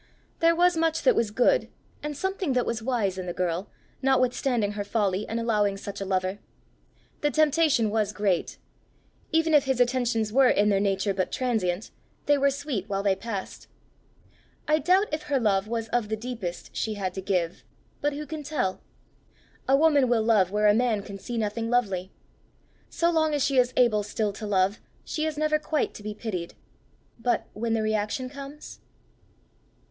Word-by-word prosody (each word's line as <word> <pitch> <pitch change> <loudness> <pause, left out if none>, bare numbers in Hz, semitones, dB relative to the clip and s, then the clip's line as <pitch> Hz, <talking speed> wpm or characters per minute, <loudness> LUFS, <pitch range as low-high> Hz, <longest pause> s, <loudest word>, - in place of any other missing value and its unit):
There 335 0 +4
was 355 +1 +4
much 325 0 +1
that - - +5
was 230 - +1
good, 250 - +2 0.3
and 295 -1 -5
something 380 -4 -1
that 250 -1 +1
was 230 -1 -2
wise 220 -6 -1
in 180 - -5
the 175 - -3
girl, 180 +2 -2 0.3
notwithstanding 255 -4 +1
her 205 0 -3
folly 200 -1 0
in 225 - -2
allowing 210 -4 +1
such 200 0 -7
a - - -2
lover. 190 +1 -1 0.8
The 295 - +1
temptation 300 -7 +3
was 215 -2 +1
great: 200 -4 -1 0.7
even 320 0 +2
if 295 -2 +5
his 265 -2 0
attentions 240 -3 +1
were 265 0 +6
in 210 +1 +3
their 200 -1 +3
nature 195 0 0
but 185 -1 -1
transient, 220 -7 -1 0.3
they 290 - +4
were 280 0 +3
sweet 275 -8 -4
while 195 0 -1
they 195 -2 +3
passed. 200 -1 -6 1.0
I 305 +1 +3
doubt 370 +5 +3
if 305 - -1
her 280 -2 +2
love 205 -3 +1
was 225 0 -3
of 240 -4 0
the 220 - -1
deepest 220 -7 -6
she 220 -1 -2
had 190 -3 -3
to 190 - -5
give; 180 -3 -1 0.4
but 290 0 +1
who 300 +1 -5
can 310 0 -6
tell? 270 -10 -2 0.9
A 270 +1 +5
woman 290 -4 +4
will 230 -2 +3
love 215 -5 +3
where 210 +2 0
a 205 - +6
man 225 -3 +1
can 200 -1 -8
see 240 +4 -5
nothing 225 +1 -2
lovely. 195 -7 0 0.8
So 340 0 +1
long 315 -2 +2
as 285 - +1
she 275 -2 +2
is 250 0 +3
able 235 -4 +4
still 205 0 -2
to 215 +1 -6
love, 195 +1 +1 0.2
she 310 0 -2
is 310 -1 -4
never 305 0 +2
quite 305 -1 -1
to - - -10
be 210 0 -5
pitied; 185 -7 -5 0.6
but 240 +1 0
when 225 +2 -1
the 220 - 0
reaction 215 +4 -1
comes 280 +1 -9
230 Hz, 185 wpm, -26 LUFS, 200-280 Hz, 1.0 s, were